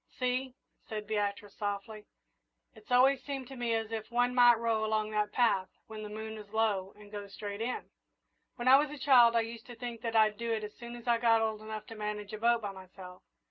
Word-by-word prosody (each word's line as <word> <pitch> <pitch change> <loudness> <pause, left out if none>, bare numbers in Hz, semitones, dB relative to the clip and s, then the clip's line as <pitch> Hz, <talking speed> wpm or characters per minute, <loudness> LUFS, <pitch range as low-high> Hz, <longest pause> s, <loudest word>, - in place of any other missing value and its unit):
"See," 255 0 -2 0.3
said 215 -2 -4
Beatrice, 205 -1 -2
softly, 210 +1 -4 0.7
"it's 220 +1 -17
always 260 +1 +5
seemed 270 -3 -5
to 270 - -8
me 240 -2 0
as 225 0 -2
if 220 -1 -4
one 245 +1 +1
might 245 -1 +7
row 225 -1 0
along 215 0 0
that 210 -1 0
path, 205 -6 +2 0.2
when 220 -1 -8
the 210 - -6
moon 220 +1 -6
is 210 -1 -12
low, 205 -4 +1
and 205 -1 -15
go 205 -1 -6
straight 205 +1 -6
in. 245 +2 -3 0.6
When 240 - -4
I 265 +1 +9
was 295 0 0
a 295 - -8
child 250 -4 +6
I 230 - +4
used 225 0 -7
to 245 - -9
think 235 -1 -6
that 230 0 -3
I'd 215 -1 +4
do 235 0 -3
it 220 -1 -2
as 210 - -6
soon 240 0 -9
as 240 0 -12
I 235 -1 +3
got 230 -1 +4
old 220 -1 -2
enough 215 0 -6
to - - -9
manage 210 -1 -5
a 215 - -5
boat 235 0 +3
by 205 - -3
myself. 185 -1 -12
220 Hz, 230 wpm, -31 LUFS, 210-240 Hz, 0.7 s, I